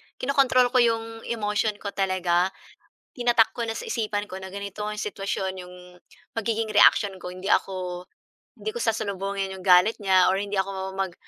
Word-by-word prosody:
kino-control 255 -2 +3
ko 255 - +4
'yong 225 -1 0
emotion 210 -2 -1
ko 205 0 -6
talaga. 185 -2 +1 0.7
Tinatak 240 -3 +3
ko 240 - -5
na 225 - -3
sa - - -6
isipan 210 -2 -2
ko 190 -2 -8
na 190 - -7
ganito 200 +1 -7
'yong 210 - -6
sitwasyon 195 -2 -3
'yong 180 0 -12 0.6
magiging 225 0 -1
reaksyon 200 -1 +5
ko, - - -6
hindi 185 +1 -9
ako 180 -2 -1 0.5
hindi - - -4
ko 475 - -4
sasalubungin 195 -2 -2
'yong 190 - -9
galit 185 +4 +4
niya 190 -1 +4
or - - 0
hindi 205 0 -3
ako 190 0 -3
mag 190 -2 -2
200 Hz, 170 wpm, -25 LUFS, 190-225 Hz, 0.7 s, reaksyon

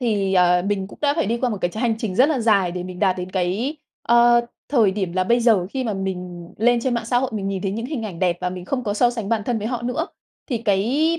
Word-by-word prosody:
thì, 205 -5 0
ờ, 180 -1 +4
mình 200 -2 -1
cũng - - -14
đã 285 -1 +3
phải 325 - 0
đi 235 +1 0
qua 245 +1 0
một 215 - -2
cái 175 - 0
tr - - -13
hành 235 -1 +1
trình 215 -5 -3
rất 260 +5 +5
là 295 -5 0
dài 200 -6 +3
để 180 0 -4
mình 180 0 -8
đạt 185 0 +2
đến 180 0 -5
cái, 195 - -1 0.3
ơ, 240 0 +5 0.3
thời 230 -8 +4
điểm 190 -3 -3
là 185 +1 +1
bây 235 +5 +3
giờ. 220 -7 +3
Khi 260 +1 -3
mà 220 -3 -1
mình 180 -3 -5
lên 240 +2 +3
trên 250 +1 0
mạng 235 -1 -2
xã 245 +1 +2
hội, 260 0 -1
mình 195 -2 -2
nhìn 195 -1 -3
thấy 195 - -1
những 230 +3 -4
hình 270 -5 -4
ảnh 190 -6 -6
đẹp 175 -1 +1
và 180 0 -1
mình 180 -1 -7
không 250 +5 -2
có 205 -2 -1
so 240 +2 +3
sánh 225 -4 -5
bản 225 -2 +1
thân 240 -2 -1
với 210 - -4
họ 240 0 -3
nữa. 250 +7 -2 0.4
Thì 240 - 0
cái 235 +11 +1
215 Hz, 295 wpm, -22 LUFS, 185-240 Hz, 0.4 s, rất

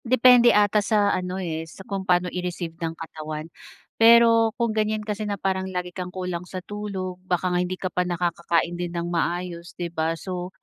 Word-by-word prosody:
Depende 245 0 +6
ata 210 -1 +4
sa 205 -1 +2
ano, 180 0 -2
eh, 165 -4 -3
sa 190 - -12
kung 195 -4 -5
pano 180 0 +4
i-receive 180 -2 -4
ng 165 0 -3
katawan. 155 -1 -6 0.6
Pero, 230 0 +7
kung 235 -2 0
ganyan 215 0 0
kasi 210 0 -3
na 200 - -2
parang 190 0 -1
lagi 180 -1 -4
kang 180 0 -5
kulang 180 -2 -4
sa 185 - -6
tulog 190 -3 -5
baka 185 0 -1
nga 180 - +2
hindi 180 +1 -3
ka 185 -2 -4
pa 180 - +1
nakakakain 170 -1 0
din 175 0 -4
ng 170 - -2
maayos 170 0 -3
di 170 -1 -4
ba. 160 0 -1
So, 180 0 -5
180 Hz, 190 wpm, -24 LUFS, 175-205 Hz, 0.6 s, Pero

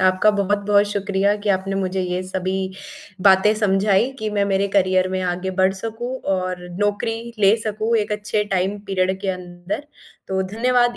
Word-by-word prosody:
आपका 185 +3 +4
बहुत-बहुत 205 0 +2
शुक्रिया 200 0 +1
कि 205 0 -5
आपने 195 0 0
मुझे 190 0 -1
ये 180 0 -2
सभी 185 0 -3 0.7
बातें 190 +2 +5
समझाई 205 +3 +2
कि 215 - -2
मैं 205 -1 +1
मेरे 200 0 +1
करियर 185 -1 +3
में 185 0 -2
आगे 180 +1 -2
बढ़ 190 0 +2
सकूँ 225 +5 -5 0.2
और 185 -1 -3 0.2
नौकरी 225 +3 -1
ले 205 +2 +5
सकूँ 215 +2 -1
एक 210 -1 -1
अच्छे 210 0 -1
टाइम 190 +3 0
पीरियड 190 0 0
के 195 - -3
अंदर, 180 +8 -6 0.4
तो 190 0 0
धन्यवाद 245 +1 +2
195 Hz, 165 wpm, -21 LUFS, 185-210 Hz, 0.7 s, बातें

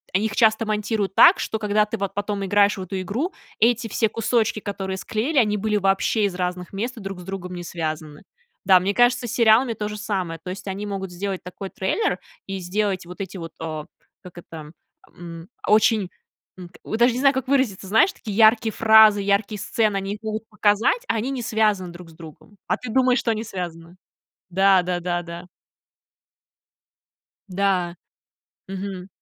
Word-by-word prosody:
они 200 +3 +2
их 215 - -6
часто 220 -1 +3
монтируют 210 -2 -1
так, - - +7
что 220 - -2
когда 210 0 +1
ты 225 - -4
вот 200 -2 -3
потом 205 -1 -3
играешь 205 +1 +3
в - - -5
эту 185 +1 -4
игру, 240 - -3 0.3
эти 230 0 +3
все 220 +1 0
кусочки, 225 0 0
которые 195 -2 -4
склеили, 245 +10 0
они 210 -3 +2
были 210 +1 0
вообще 195 +2 +1
из 195 -3 -2
разных 180 -1 -3
мест 235 +6 -4
и - - -7
друг 195 -2 -6
с - - -9
другом 180 -1 -6
не 175 - -6
связаны. 155 -3 -5 0.4
Да, 185 -1 +6
мне 195 +3 -1
кажется, 245 +2 +3
с - - -5
сериалами 230 +1 +4
то 210 -1 -4
же 210 - -6
самое. 190 -6 -3
То 180 - -5
есть, 190 +1 -8
они 195 +2 -4
могут 195 -2 -5
сделать 190 +1 -4
такой 180 +2 -8
трейлер 190 - -1 0.3
и 195 0 -5
сделать 190 +1 -2
вот 180 +3 -8
эти 190 0 -6
вот, 165 -2 -8
а, 155 -2 -5 0.4
как 180 -1 -13
это, 160 -3 -10 0.5
м, 170 -1 -9 0.2
очень, 215 -2 +3 0.5
м, 180 -1 -9
о, - - -4
даже 240 +1 +4
не 245 - -3
знаю, 275 +1 +4
как 265 -1 -3
выразиться. 260 -9 0
Знаешь, 225 - +4
такие 210 -3 -7
яркие 220 0 +5
фразы, 220 -2 +6
яркие 200 +2 0
сцены, 215 0 0
они 195 +1 -3
их 210 - -15
могут 220 0 -4
показать, 210 - +2
а - - 0
они 230 +5 -2
не 265 -2 -3
связаны 215 -5 0
друг 175 0 -12
с - - -17
другом. 160 +4 -14
А - - +1
ты 250 -3 -7
думаешь, 255 +1 +3
что 230 - 0
они 220 0 -2
связаны. 175 -4 -7 0.5
Да 190 +1 +4
да 175 0 -2
да 175 0 -2
да. 170 +1 -9 2.0
Да. 185 -2 0 0.7
Мгм. 190 -1 -6
200 Hz, 190 wpm, -23 LUFS, 180-220 Hz, 2.0 s, так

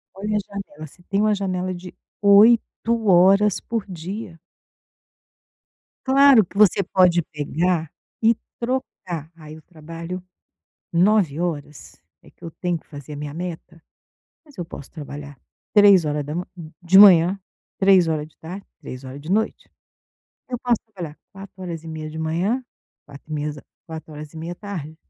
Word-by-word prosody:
Olha 210 +2 -3
a - - +1
janela. 195 -6 -8
Você 175 +5 -20
tem 200 +3 -1
uma 215 -1 +3
janela 185 -2 -2
de 180 +1 -9 0.3
8 225 +2 +4
horas 195 +3 +5
por 225 -3 -4
dia. 180 0 -7 1.7
Claro 270 -4 +6
que 200 - -13
você 205 -2 +5
pode 175 -1 +3
pegar 160 +2 -1 0.3
e 225 +1 +4 0.2
trocar, 185 - -4
"Aí, 155 0 -11
o - - -15
trabalho 165 +2 -8 0.7
9 180 -4 +3
horas 150 -4 -5 0.2
é - - -18
que - - -24
eu 165 - -7
tenho 175 +1 -2
que - - -20
fazer 145 -1 -9
a - - -6
minha 145 0 -6
meta, 170 -1 -7 0.6
mas 290 -8 -20
eu 175 - -4
posso 145 - -10
trabalhar 145 -2 -9 0.4
3 200 -5 +7
horas 150 0 -1
da 150 +3 -5
man 180 - -3 0.4
de 180 +2 +4
manhã, 185 -1 +7 0.4
3 190 -3 +5
horas 155 -1 -1
de 155 - -27
tarde, 180 +5 -9
3 130 +1 -9
horas 130 +2 -8
de 155 - -10
noite. 220 +2 -1 0.8
Eu 245 -2 -3
posso 245 -1 +1 0.2
trabalhar 170 -6 -7 0.2
4 195 -1 -11
horas 165 -3 -5
e 165 - -10
meia 155 -1 -6
de 160 - -8
manhã, 180 +11 -1 0.4
4 145 +2 -12
meias 150 0 -3 0.3
4 160 -1 -9
horas 150 +1 -9
e - - -13
meia 165 +2 -5
à - - -6
tarde". 175 -6 -7
175 Hz, 165 wpm, -22 LUFS, 155-200 Hz, 1.7 s, 3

